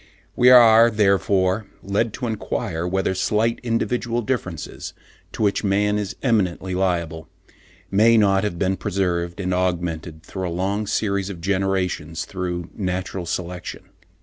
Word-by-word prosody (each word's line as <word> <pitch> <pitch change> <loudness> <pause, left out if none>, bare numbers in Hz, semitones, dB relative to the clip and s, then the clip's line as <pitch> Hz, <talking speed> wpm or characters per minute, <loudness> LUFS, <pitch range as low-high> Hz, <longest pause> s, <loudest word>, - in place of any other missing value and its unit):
We 125 - +5
are 115 -2 +8
therefore 100 -1 +2 0.2
led 105 +3 0
to 125 - -4
enquire 90 -6 -3
whether 95 +1 0
slight 105 +5 0
individual 120 0 -1
differences, 95 - -4 0.4
to - - -2
which 100 +1 +1
man 105 +1 +1
is 100 -2 -4
eminently 95 -7 0
liable, 85 -4 -1 0.6
may 110 +4 +5
not 100 -2 +3
have 105 -5 -2
been 95 +1 0
preserved 90 -3 -2
and 90 -1 -1
augmented 85 -3 -2
during 90 0 -4
a - - -4
long 100 +3 -1
series 100 -2 -1
of 95 -4 -7
generations 95 -4 -1
through 90 -2 -4
natural 95 -2 -3
selection. 90 +1 -5
95 Hz, 135 wpm, -22 LUFS, 90-105 Hz, 0.6 s, are